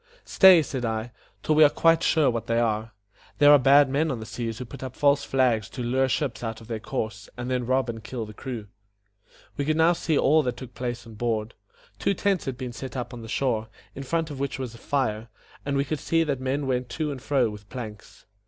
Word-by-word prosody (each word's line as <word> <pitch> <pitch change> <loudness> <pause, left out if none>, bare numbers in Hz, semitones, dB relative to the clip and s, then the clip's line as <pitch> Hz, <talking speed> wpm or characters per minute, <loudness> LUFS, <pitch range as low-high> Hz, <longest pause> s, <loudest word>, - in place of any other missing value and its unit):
"Stay," 185 -4 +7
said 130 -3 -4
I, 110 +1 -2 0.3
"till 155 - +2
we 155 +1 +7
are 145 - +7
quite 165 +2 +3
sure 155 -6 +3
what 115 -1 -4
they 115 0 +1
are. 110 -1 0 0.5
There 145 0 +7
are 145 - +8
bad 140 +2 +6
men 145 +4 0
on 130 -5 -2
the 110 - -7
seas 115 0 -4
who 125 - -6
put 115 - -11
up 130 -1 -6
false 140 0 +3
flags 120 -5 +1
to 125 - -6
lure 130 +2 +1
ships 130 -3 -2
out 115 -1 -4
of 115 - -14
their 115 -2 -4
course, 110 -3 -5
and 125 +1 -4
then 125 -2 -1
rob 130 0 +1
and 115 -2 -6
kill 120 -4 -5
the 105 - -10
crew." 120 -2 -6 0.9
We 140 - 0
could 155 +1 +1
now 165 +2 +5
see 165 -3 0
all 155 +3 +4
that 125 -3 -3
took 125 -1 -9
place 120 -1 -4
on 115 - -11
board. 110 0 -2 0.5
Two 195 - +1
tents 195 -1 0
had 130 -2 -4
been 125 -2 -5
set 130 +2 -7
up 125 - -5
on 120 - -8
the 115 - -9
shore, 115 -4 0 0.3
in 135 - -7
front 160 +3 -2
of 140 - -7
which 140 -1 -2
was 130 -3 -5
a 115 - -13
fire; 115 -6 -1 0.4
and 140 -1 0
we 140 - +1
could 150 +1 -3
see 165 0 +1
that 140 -4 -2
men 135 +2 -1
went 125 -1 -1
to 150 +3 -2
and 135 -3 -7
fro 130 -5 +1
with 105 -1 -12
planks. 110 -5 -9
130 Hz, 245 wpm, -25 LUFS, 115-145 Hz, 0.9 s, are